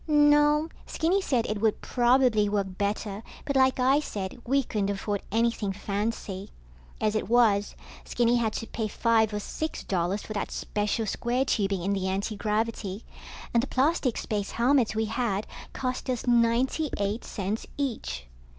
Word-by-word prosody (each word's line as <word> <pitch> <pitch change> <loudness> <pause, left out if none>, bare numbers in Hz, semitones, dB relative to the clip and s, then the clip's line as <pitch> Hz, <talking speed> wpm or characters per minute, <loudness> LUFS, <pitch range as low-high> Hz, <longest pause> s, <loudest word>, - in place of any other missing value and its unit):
No, 295 0 +5 0.2
Skinny 360 +5 +1
said 250 -10 +1
it 210 -1 -3
would 220 -2 +2
probably 240 -4 +3
work 200 -2 -1
better, 205 0 -2 0.2
but 280 -2 -2
like 260 0 +4
I 265 +3 +4
said, 205 -6 -5
we 275 +2 +3
couldn't 205 -4 -1
afford 200 0 -2
anything 225 -2 +1
fancy. 200 -1 -3 0.5
As 215 -1 +1
it 215 - -2
was, 220 -4 +3 0.3
Skinny 240 0 +2
had 225 -2 0
to - - -3
pay 220 -1 -3
five 220 0 +2
or 210 - -2
six 315 +9 -4
dollars 185 +2 -1
for 215 - -6
that 205 - -2
special 210 +2 -1
square 245 +5 0
tubing 195 -7 0
in 200 +2 +1
the 190 -1 -1
antigravity, 210 +1 -2 0.5
and 235 - +4
the 265 - -3
plastic 265 -2 +1
space 205 -2 -2
helmets 245 -2 +3
we 220 0 +1
had 215 -2 -1 0.3
cost 255 0 -3
us 250 -2 -1
ninety 240 +5 +2
eight 205 +3 -1
cents 205 +1 -3
each. 220 - -3
225 Hz, 160 wpm, -27 LUFS, 205-255 Hz, 0.5 s, No